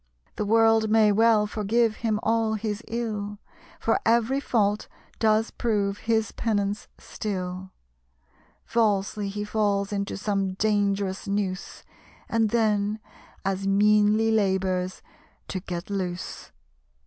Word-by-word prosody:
The 210 - -2
world 225 0 +4
may 215 -1 +5
well 220 0 +4
forgive 215 +2 +1
him 220 -2 0
all 225 -1 +1
his 215 0 -3
ill, 210 -3 -3 0.4
For 225 - +1
every 235 +4 +2
fault 210 -6 0 0.3
does 220 0 +2
prove 205 -4 -1
his 220 +1 0
penance 205 -2 -1
still; 185 -2 -5 1.0
Falsely 210 -2 0
he 205 +1 -4
falls 205 -1 0
into 200 -1 -2
some 195 -1 -1
dangerous 200 -1 0
noose, 200 -2 -3 0.4
And 225 -1 +1
then 215 -2 +1 0.5
as 195 0 -1
meanly 210 +2 +4
labours 190 -3 0 0.5
to 190 - -2
get 180 0 -6
loose." 185 -2 -4
210 Hz, 115 wpm, -26 LUFS, 200-220 Hz, 1.0 s, may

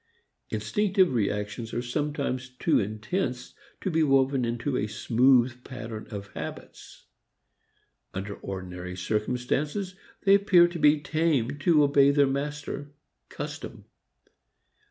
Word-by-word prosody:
Instinctive 195 - +1
reactions 105 0 -2
are 120 - 0
sometimes 135 -1 -2
too 125 - +1
intense 120 - -3 0.3
to 190 - -1
be 160 0 +2
woven 135 -3 +3
into 120 +4 -2
a 105 - 0
smooth 125 +3 +3
pattern 115 -4 -7
of 100 -2 -7
habits. - - -9 1.1
Under 100 +2 -5
ordinary 90 -1 -6
circumstances 125 - -1 0.3
they 195 - +5
appear 195 -3 +6
to 175 -1 -6
be 150 0 +5
tamed 145 -4 0
to 155 -2 +5
obey 140 -1 +5
their 140 0 +4
master, 145 +1 -4 0.3
custom. - - -7
130 Hz, 115 wpm, -27 LUFS, 115-150 Hz, 1.1 s, appear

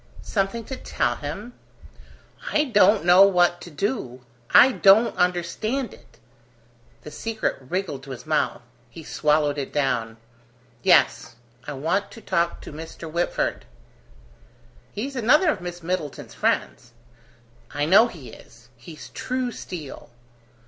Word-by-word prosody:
"Something 200 +3 -2
to 265 - -6
tell 120 - -2
him?" 200 +12 -7 1.0
"I 300 - +3
don't 210 - +4
know 180 +2 +7
what 175 -3 +4
to - - -9
do: 145 - -4 0.2
I 265 - +7
don't 220 0 +5
understand 185 +8 -1
it!" 115 - -19 0.9
The 150 - -9
secret 220 +7 -3
wriggled 150 0 -4
to - - -12
his 130 -3 -8
mouth. - - -1 0.3
He - - -11
swallowed 150 -1 +1
it 135 - -5
down. 120 -6 -1 0.6
"Yes, - - +3 0.3
I 145 - -4
want 165 +9 -1
to - - -11
talk 170 -4 -1
to - - -10
Mr. 160 +1 -9
Whitford." 170 +2 -1 1.3
"He's 270 +7 -5
another 300 - +4
of 205 - -5
Miss 175 -1 -7
Middleton's 165 -5 -4
friends." 120 -1 -2 0.8
"I 145 +1 -1
know 200 +8 +6
he 160 - -11
is. 120 +1 -17
He's 150 +6 -12
true 255 -1 -3
steel." 165 - -9
175 Hz, 130 wpm, -24 LUFS, 145-215 Hz, 1.3 s, know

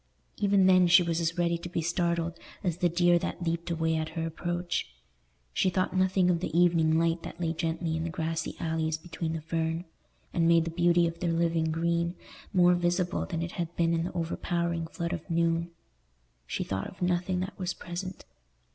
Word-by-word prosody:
Even 200 -2 +3
then 185 -1 +6
she 180 +1 +7
was 170 -1 0
as 165 +1 -1
ready 170 -1 +1
to 175 - -7
be 170 - -2
startled 170 0 0 0.3
as 175 -4 0
the 175 - +2
deer 175 +1 +4
that 175 - -4
leaped 170 +1 -2
away 160 -1 0
at 155 0 -2
her 165 - 0
approach. 175 +2 -2 0.7
She 185 - +2
thought 185 +1 0
nothing 185 -1 +3
of 170 - +1
the 180 - -2
evening 165 -2 +4
light 165 0 +1
that 170 - -8
lay 165 -2 0
gently 165 0 -2
in 160 - -2
the 165 - -2
grassy 160 -1 -3
alleys 160 -1 -1
between 165 0 -4
the 160 - -3
fern, 165 +1 -2 0.5
and 165 -1 +2
made 165 -1 +5
the 165 - -3
beauty 175 0 +3
of 165 0 -3
their 170 -1 0
living 165 -1 +1
green 170 +2 0 0.4
more 180 -1 +5
visible 175 +1 0
than 165 -3 -2
it 170 - -4
had 170 -1 -4
been 170 0 +2
in 165 0 0
the 180 - -5
overpowering 170 0 -1
flood 170 +1 -4
of 175 +1 -6
noon: 165 0 +1 0.8
she - - -2
thought 95 -1 -3
of 185 - -7
nothing 180 +1 +1
that 190 +2 -6
was 185 0 -2
present. 185 +2 -6
170 Hz, 200 wpm, -29 LUFS, 165-175 Hz, 0.8 s, she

